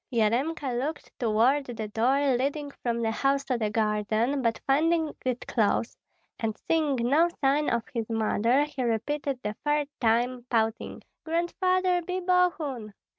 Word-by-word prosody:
Yaremka 250 +5 0
looked 300 +5 -4
toward 245 +5 +2
the 225 -3 -5
door 260 +5 +2
leading 285 +3 -2
from 235 -1 -1
the 225 - +1
house 275 +4 +1
to 255 - 0
the 220 -3 -1
garden, 215 +5 0
but 230 -2 0
finding 320 +3 +2
it 255 -1 -2
closed, 225 +1 0 0.4
and 220 -2 -2
seeing 310 -4 +2
no 280 +8 +3
sign 285 +2 +2
of 235 -1 0
his 230 -2 -3
mother, 225 +4 +2
he 295 -3 -5
repeated 260 +4 -1
the 210 - -2
third 295 -1 +1
time, 240 +2 +1
pouting, 225 -1 -1 0.2
"Grandfather, 360 +2 +1
be 365 +2 -3
Bogun!" 330 - 0
260 Hz, 145 wpm, -27 LUFS, 225-295 Hz, 0.4 s, no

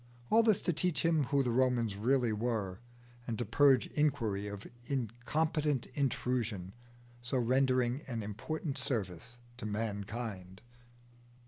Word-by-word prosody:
All 225 - +7
this 220 -4 +3
to 175 - +1
teach 165 -2 0
him 160 -4 +3
who 140 +2 +2
the 125 - 0
Romans 120 -4 +2
really 120 +2 +2
were, 105 -4 -2 0.5
and 115 -2 -2
to - - -2
purge 130 +3 +5
Inquiry 110 -9 0
of 100 0 -7 0.2
incompetent 140 +3 0
intrusion, 120 -8 -1 0.5
so 120 +2 -1
rendering 130 +1 +2
an 115 -4 -3
important 135 +8 -3
service 115 - -3 0.2
to 120 - -5
mankind. 105 -2 -4
120 Hz, 125 wpm, -33 LUFS, 105-140 Hz, 0.5 s, All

